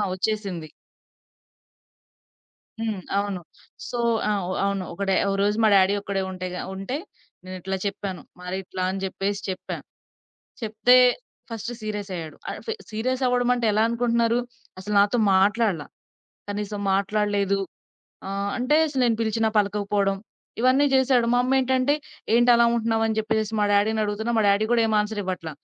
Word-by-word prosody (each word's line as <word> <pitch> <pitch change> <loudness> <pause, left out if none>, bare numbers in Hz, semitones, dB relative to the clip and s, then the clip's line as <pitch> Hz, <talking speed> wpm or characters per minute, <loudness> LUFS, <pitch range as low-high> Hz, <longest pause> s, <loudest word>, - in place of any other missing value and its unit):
ఒచ్చేసింది. 190 -4 -2 2.1
హ్మ్. 220 -4 -2 0.2
అవును. 200 -2 -2 0.5
సో 240 - -4 0.3
ఆహ్, 200 -3 0 0.2
అవును. 200 -1 -1
ఒకడే 195 +2 -1 0.2
ఒకరోజు 200 +1 +1
మా - - +6
డ్యాడి 195 0 +5
ఒక్కడే 200 -1 -2
ఉంటే 185 0 -5
గ - - -5 0.2
ఉంటే 195 +8 -4 0.5
నేనిట్లా 185 +1 -4
చెప్పాను. 195 -2 -4 0.2
మరిట్లా 185 +1 -5
అని 195 +1 -4
జెప్పేసి 195 +1 -2
చెప్పాను. 185 -1 -5 0.8
చెప్తే 230 +2 +4 0.5
ఫస్ట్ 230 +1 -5
సీరియస్ 210 -2 -4
అయ్యాడు. 160 -2 -7
ఆహ్, - - -6
ఫ్ - - -2 0.2
సీరియస్ 250 +4 -2
అవడమంటే 245 -1 +2
ఎలా 215 +1 +3
అనుకుంటున్నారు? 235 0 +1 0.4
అసలు 210 +2 -4
నాతో 205 +4 +2 0.2
మాట్లాడల. 195 -4 +2 0.7
కనీసం 205 0 -4
మాట్లాడలేదు 200 0 +1 0.7
ఆహ్, 200 +1 -2
అంటే 255 +4 +2
అసలు 270 -3 -1
నేను 230 -2 +2
పిలిచినా 220 0 +1
పలకకపోవడం 200 -1 +1 0.4
ఇవన్నీ 260 +3 +4
జేసాడు. 260 -2 +3
మా 245 - +4
అమ్మేంటంటే 260 +1 +2 0.4
ఏంటలా 240 0 +5
ఉంటున్నావు? 225 -1 +1
అని 220 - -1
జేప్పేసి 220 0 -1
మా - - +3
డ్యాడినడుగుతున్నా 215 +2 +1
మా - - +2
డ్యాడి 200 +2 +2
గూడా 235 -1 +4
ఏం 220 - +1
ఆన్సర్ 210 0 -3
ఇవ్వట్ల. 180 -3 -4
210 Hz, 135 wpm, -24 LUFS, 195-230 Hz, 2.1 s, మా